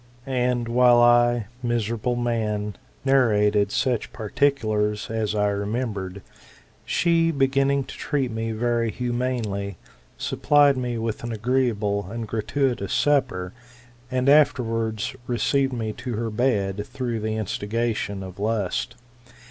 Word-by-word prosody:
''And 125 -2 0
while 120 0 +5
I, 120 -1 +4 0.2
miserable 120 0 -1
man, 110 -4 -1 0.3
narrated 105 -6 +3
such 125 -4 0
particulars 110 -3 0
as 110 -2 -1
I 105 -1 +2
remembered, 100 -2 -3 0.6
she, 165 -1 +2
beginning 140 -1 +2
to - - -10
treat 135 -4 -1
me 115 0 -3
very 115 +1 0
humanely, 120 -6 -2 0.4
supplied 145 -1 +3
me 125 -2 -2
wiih 115 -1 -3
an 120 -1 -3
n^^reeable 105 -5 0
and 115 0 -5
gratuitous 115 -1 -1
supper, 95 -11 +1 0.6
and 130 0 0
afterwards 115 -6 +2
received 135 +3 +1
me 110 -3 -3
10 125 - -5
her 115 +1 -2
bed, 105 -4 0
through 125 -4 -3
the 110 0 -2
instigation 110 -1 -2
of 95 0 -9
lust. 105 -3 -1
115 Hz, 115 wpm, -24 LUFS, 105-125 Hz, 0.6 s, while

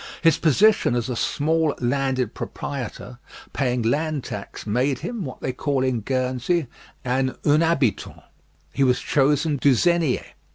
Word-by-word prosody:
His 165 -1 +4
position 170 - +3
as 120 +1 -1
a 125 - -2
small 155 +5 0
landed 130 -1 0
proprietor 125 -2 -6 0.3
paying 125 -3 0
land 145 +4 0
tax, 100 -1 -7
made 125 +5 0
him, 235 -5 -4
what 130 - -8
they 130 - -2
call 135 0 -1
in 130 -3 0
Guernsey, 130 - -1 0.4
an 130 +1 0
unhabitant. 150 -5 +1 0.5
He 140 - +1
was 125 -1 +3
chosen 145 +2 +1
douzenier. 155 +2 +2
135 Hz, 130 wpm, -23 LUFS, 125-155 Hz, 0.5 s, His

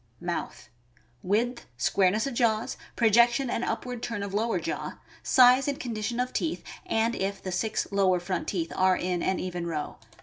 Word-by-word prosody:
Mouth.— - - -4 0.5
Width, 235 +6 -1
squareness 195 - +2
of 275 - -3
jaws, 230 -2 +1 0.2
projection 235 +3 +4
and 235 - -1
up 225 +1 -2
ward 250 -2 -5
turn 230 -4 -3
of 200 -1 -5
lower 225 +3 0
jaw; - - -4 0.2
size 255 +1 +6
and 285 -1 -1
condition 235 0 -3
of 250 0 -1
teeth, 325 - -2 0.2
and 225 +1 +1
if 195 -1 -2
the 185 - -5
six 200 +5 -1
lower 190 -2 +3
front 175 0 -3
teeth 165 -4 -2
are 185 0 +3
in 180 -1 -1
an 190 - 0
even 180 -2 -4
row. 155 -3 -4
215 Hz, 175 wpm, -27 LUFS, 185-240 Hz, 0.5 s, size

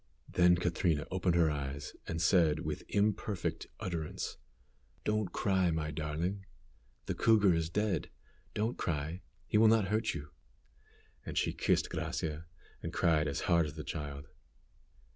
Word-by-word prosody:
Then 90 0 +5
Catrina 85 -3 +1
opened 90 -2 +1
her 85 -3 +4
eyes, 70 -1 -4
and 80 - -2
said, 85 -3 +4
with - - -3
imperfect 105 -2 0
utterance, 85 -4 -4 0.7
"Don't 105 -3 0
cry, 95 -3 +2
my 80 -1 -1
darling. 80 +6 -3 0.6
The - - -1
cougar 105 -5 +5
is 80 -1 0
dead. 100 -3 0 0.5
Don't 110 +4 -1
cry; 80 +3 -2 0.2
he 105 - +2
will 110 - +7
not 110 -3 +4
hurt 110 +1 +1
you." 70 0 -6 0.9
And - - -6
she - - +1
kissed - - +1
Gracia, 80 +1 -3 0.3
and - - -4
cried 80 -2 +2
as 70 - -2
hard 85 -2 +3
as 75 - -8
the 80 - -5
child. 75 -3 -5
85 Hz, 145 wpm, -33 LUFS, 75-100 Hz, 0.9 s, will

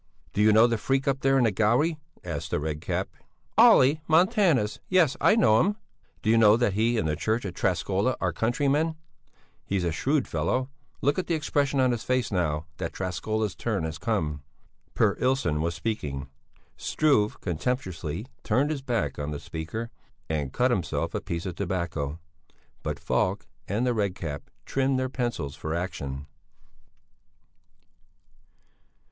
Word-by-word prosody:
"Do 100 - +1
you 110 +1 +6
know 110 +2 +7
the 115 -2 +1
freak 135 +3 0
up 135 -1 +1
there 135 0 +3
in 130 - +4
the 115 - +3
gallery?" 120 - +2 0.2
asked - - -4
the - - 0
Red 75 0 -3
Cap. - - -2 0.5
"Olle 135 +4 +7
Montanus, 165 - +3
yes, 180 -7 +4
I 210 - +5
know 110 - +5
him." 205 +3 +1 0.5
"Do 110 - +3
you 115 - +5
know 110 0 +7
that 120 -5 +1
he 115 +3 +2
and 80 - 0
the 75 - 0
church 110 +9 -1
of 95 - -4
Träskola 95 +7 0
are - - 0
countrymen? 145 +7 +1 0.7
He's 100 -2 -1
a 85 - 0
shrewd 135 - 0
fellow! 130 +1 -1 0.3
Look 145 +6 +2
at 185 - -3
the 170 - +1
expression 140 -2 0
on 130 -1 +4
his 120 -2 -2
face 130 -2 0
now 80 -5 0
that - - -4
Träskola's 105 +3 -2
turn 110 -7 -2
has 80 0 -4
come." 80 -11 -1 0.5
Per - - +3
Ilsson 125 - +1
was 85 +1 -1
speaking. 75 -8 -3 0.5
Struve 135 -9 +1
contemptuously 90 - -3 0.2
turned 130 +7 +2
his 145 -3 -3
back 115 - -2
on 70 0 -3
the 75 -1 -4
speaker 110 +12 -5 0.4
and 75 -4 -2
cut 125 - +2
himself 95 -8 -1
a - - -2
piece 85 +1 -4
of 90 - -3
tobacco. 85 -5 -3 0.6
But - - -3
Falk - - 0 0.2
and 110 +6 0
the 125 - +2
Red 100 -5 0
Cap 75 -6 -6 0.2
trimmed 135 0 +1
their 130 0 -1
pencils 120 - -3
for 80 +2 -4
action. 70 -6 -4
110 Hz, 165 wpm, -27 LUFS, 85-130 Hz, 0.7 s, know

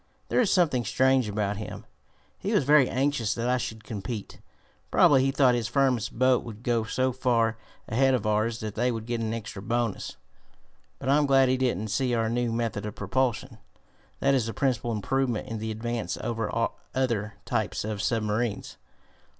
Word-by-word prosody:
"There - - +3
is 220 - +2
something 155 -10 +3
strange 130 +1 +2
about 105 -1 -1
him. 110 - -7 0.5
He - - -2
was - - +3
very 145 -1 +5
anxious 130 -4 0
that 120 +1 -2
I 125 0 +2
should 110 -3 -5
compete. 110 -1 -6 0.5
Probably 135 -2 +5
he 135 - +2
thought 135 -2 +4
his 120 -2 0
firm's 125 -3 +1
boat 130 +1 +2
would 115 -1 -9
go 120 -2 +1
so 130 +3 0
far 115 -3 +1 0.3
ahead 130 +3 +3
of 115 - -3
ours 110 +2 0
that 110 -2 -4
they 125 +3 +1
would 115 -2 -4
get 120 0 -2
an 110 -1 -2
extra 110 -3 -5
bonus. 115 - -2 0.8
But 135 - -4
I'm 145 +1 +4
glad 135 -1 +5
he 130 - +2
didn't 115 -5 -1
see 125 +3 0
our 115 -1 0
new 120 0 0
method 115 -3 -2
of 105 - -7
propulsion. 130 -2 -1 0.6
That 140 - +3
is 125 -4 +1
the 115 - -5
principal 120 -2 0
improvement 120 +2 -1
in 110 -1 -4
the 110 +1 -4
Advance 115 +1 -3
over 115 -2 -2 0.5
other 115 -5 -1
types 110 -3 -1
of 105 -2 -3
submarines. 110 -1 -1
120 Hz, 180 wpm, -27 LUFS, 110-130 Hz, 0.8 s, very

